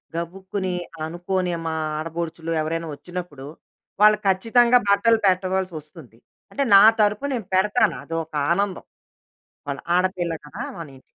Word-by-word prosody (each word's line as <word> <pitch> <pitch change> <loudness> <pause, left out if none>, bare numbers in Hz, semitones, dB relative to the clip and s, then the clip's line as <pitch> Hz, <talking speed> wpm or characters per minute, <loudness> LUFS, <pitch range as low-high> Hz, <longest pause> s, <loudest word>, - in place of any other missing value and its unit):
గబుక్కుని 185 +2 -4 0.3
అనుకోనే 175 +2 -2
మా 160 - -2 0.2
ఆడపడుచులు 165 +1 -5
ఎవరైనా 165 +1 -3
వచ్చినప్పుడు, 150 -2 -8 0.6
వాళ్ళకు 210 0 +5
ఖచ్చితంగా 235 +6 +4
బట్టలు 225 +3 +4
పెట్టవలసి 185 -1 +1
వస్తుంది. 150 -6 -15 0.3
అంటే 280 - -1
నా 195 - +9 0.2
తరపు 210 +5 +2
నే 255 - 0 0.2
పెడతాను. 205 +5 +2
అది 165 - -6
ఒక 160 - -20 0.2
ఆనందం. 195 +1 -1 0.8
వాళ్ళ - - -3 0.2
ఆడపిల్ల 180 -2 0
కదా! 205 - -7 0.2
మన 165 - -6
ఇంటికి. - - -17
185 Hz, 130 wpm, -23 LUFS, 165-200 Hz, 0.8 s, నా